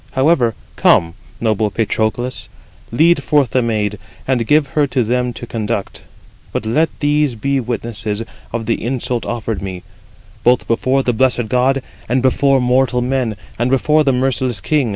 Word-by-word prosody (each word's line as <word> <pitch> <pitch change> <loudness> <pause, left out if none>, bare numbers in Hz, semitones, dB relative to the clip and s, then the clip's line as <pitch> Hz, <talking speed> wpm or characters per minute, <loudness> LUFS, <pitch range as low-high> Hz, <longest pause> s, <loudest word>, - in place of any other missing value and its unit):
However, 130 -5 +2 0.2
come, 85 0 +4 0.3
noble 110 -2 +1
Patroclus, 110 +3 -2 0.4
lead 165 +8 +4
forth 145 -5 +2
the 130 - +2
maid, 105 -3 -1 0.3
and 125 -4 0
give 150 -2 +3
her 145 0 +1
to 130 -2 0
them 125 +2 0
to 120 - -7
conduct; 110 -3 -3 0.5
but - - -3
let 150 +9 +2
these 145 -3 +2
be 140 +5 0
witnesses 115 -2 -3 0.3
[of 115 -1 -3
the 115 - -1
insult 120 0 -2
offered 110 -3 -3
me], 95 -2 -6 0.6
both 125 0 +3
before 130 +3 +1
the 125 - +1
blessed 125 -1 +1
gods, 130 +2 +2 0.3
and 125 +1 +1
before 135 +1 +3
mortal 125 0 +2
men, 125 -4 -1 0.2
and 120 +1 +1
before 150 +4 +3
the 140 - +3
merciless 130 -3 0
king. 140 +4 +1
125 Hz, 155 wpm, -17 LUFS, 115-135 Hz, 0.6 s, come